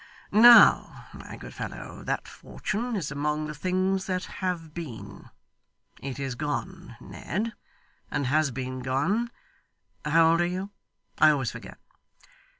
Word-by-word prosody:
Now, 235 +3 +7
my - - -10
good - - -10
fellow, - - -7
that - - -2
fortune 230 +3 -4
is 160 -8 -3
among 150 +1 -1
the 150 - -5
things 185 +4 -1
that 185 0 -1 0.2
have 170 -4 -3
been. 155 -10 -8 0.7
It 135 -1 -5
is 135 -2 -3
gone, 150 +2 -5
Ned, 220 +5 -4 0.6
and 140 - -1
has 150 +3 +2
been 130 0 -5
gone 145 - 0 0.7
how 160 +2 +4
old 165 +1 +3
are 175 - +2
you? 185 +3 -4 0.5
I 155 - +7
always 140 -5 +1
forget. - - -10
165 Hz, 135 wpm, -27 LUFS, 140-190 Hz, 0.7 s, Now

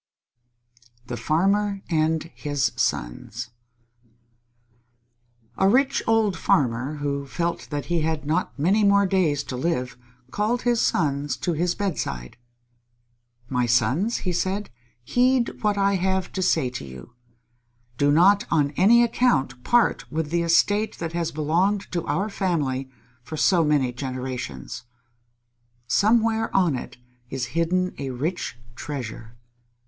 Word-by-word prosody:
_ - - -28
THE 120 - -4
FARMER 195 +8 +1
AND 160 0 0
HIS 145 -3 -1
SONS - - -3 2.1
A 190 - +4
rich 275 +5 +3
old 220 -4 +3
farmer, 130 -2 +1
who 140 -1 -3
felt 170 +4 -3
that 145 -2 -3
he 175 -2 0
had 155 -1 -2
not 160 +2 -1
many 190 +9 +2
more 200 0 +5
days 175 -7 +1
to 130 - -6
live, 130 -2 -2 0.4
called 225 +4 0
his 240 -2 +2
sons 145 -2 0
to 175 - -1
his 175 +2 0
bedside. 70 - -3 1.1
"My 125 -1 0
sons," 125 - +2
he 180 - 0
said, 190 +4 -2 0.3
"heed 250 - +1
what 210 -1 +1
I 200 0 +2
have 190 0 -1
to 190 - -2
say 160 -8 +1
to 125 - -6
you. 65 - -11 0.9
Do 145 0 +4
not 195 +7 +4
on 145 -4 +2
any 220 +10 +5
account 140 - +1
part 240 -1 +2
with 155 -1 -2
the 170 0 +1
estate 205 +6 +2
that 165 -1 -5
has 170 -1 -1
belonged 175 +7 0
to 170 -2 -2
our 195 +3 0
family 150 -10 -1 0.3
for 150 +6 -7
so 170 +1 +4
many 145 -5 +1
generations. 125 - -5 1.0
Somewhere 225 - +2
on 175 -7 +3
it 125 - -7 0.3
is 130 -1 -3
hidden 180 +3 0
a 140 -1 -3
rich 140 +2 -3 0.2
treasure. 120 -5 -7
165 Hz, 135 wpm, -24 LUFS, 135-195 Hz, 2.1 s, more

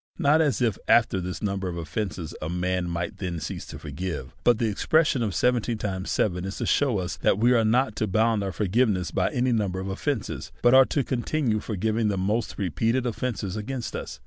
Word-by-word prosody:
Not 155 -1 +4
as 145 -5 +1
if 115 -5 0
after 110 -5 +4
this 90 +3 -5
num 100 -1 -1
ber 95 -1 -3
of 85 - -5
offences 85 +1 -4
a 75 - -3
man 90 0 -1
might 85 0 -3
then 90 -3 -3
cease 75 - -6
to - - -8
forgive; 85 +5 -5
by 120 - +6
the 120 0 -1
expression 150 +6 +2
of 105 -5 -1
seventy 120 -1 +1
times 95 -3 -4
seven, 90 -3 0
is 95 +1 -5
to - - -2
shew 135 -7 +2
us 90 -1 -3
that - - +2
we 120 +3 +4
are 115 -2 +4
not 115 +1 +2
to 110 - 0
bound 110 +1 +2
our 95 - -2
forg 100 -1 -2
iveness 100 -9 +2
by - - +1
any 130 -3 0
number 100 -5 0
of 95 +1 -4
offences, 110 +4 -3
but 120 - +6
are 130 0 +8
to 140 - 0
continue 125 -2 0
forgiving 110 +2 -1
the 100 -2 0
most 105 +5 -1
repeated 115 - 0
offences 110 -5 -3
against 120 +3 -4
us. - - -6
105 Hz, 220 wpm, -26 LUFS, 95-120 Hz, -, are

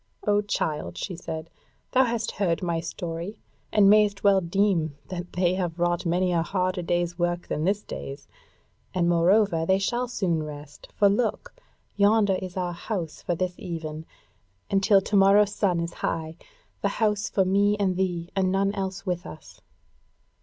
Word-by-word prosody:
"O 205 0 +3
child," 150 - -2
she 180 - -4
said, 160 -1 -6 0.4
"thou 260 0 +4
hast 230 -2 -2
heard 180 -4 -1
my 170 -2 0
story, 170 +5 -5 0.3
and 205 -2 +5
mayst 205 -1 +4
well 195 -1 +5
deem 170 -4 +1
that 175 -1 -6
they 180 0 +2
have 175 -3 -2
wrought 175 0 0
many 180 +2 +1
a 170 -1 +2
harder 185 +1 -1
day's 175 0 -1
work 175 0 -1
than 155 - -2
this 205 +2 +1
day's. 70 0 -7 0.7
And 175 -2 +2
moreover 175 +1 +3
they 190 +3 +3
shall 240 +5 -1
soon 185 -9 -1
rest; 145 -1 -9
for 205 - +5
look! 210 +3 0 0.4
yonder 205 0 +4
is 185 -1 -7
our 180 -1 -1
house 170 -4 -5
for 175 - -1
this 180 +1 -2
even, 160 -2 -6 0.6
and 195 - +3
till 195 0 +5
to 205 - -2
morrow's 200 +1 +5
sun 180 -4 +1
is 170 0 -3
high: 160 0 -3 0.5
the - - +1
house 210 -1 +1
for 190 - +2
me 200 +2 +3
and 190 -2 +1
thee 180 -2 -2
and 190 -1 +2
none 195 +1 +1
else 190 -1 -4
with 180 -1 -2
us." - - -12
185 Hz, 170 wpm, -26 LUFS, 170-200 Hz, 0.7 s, and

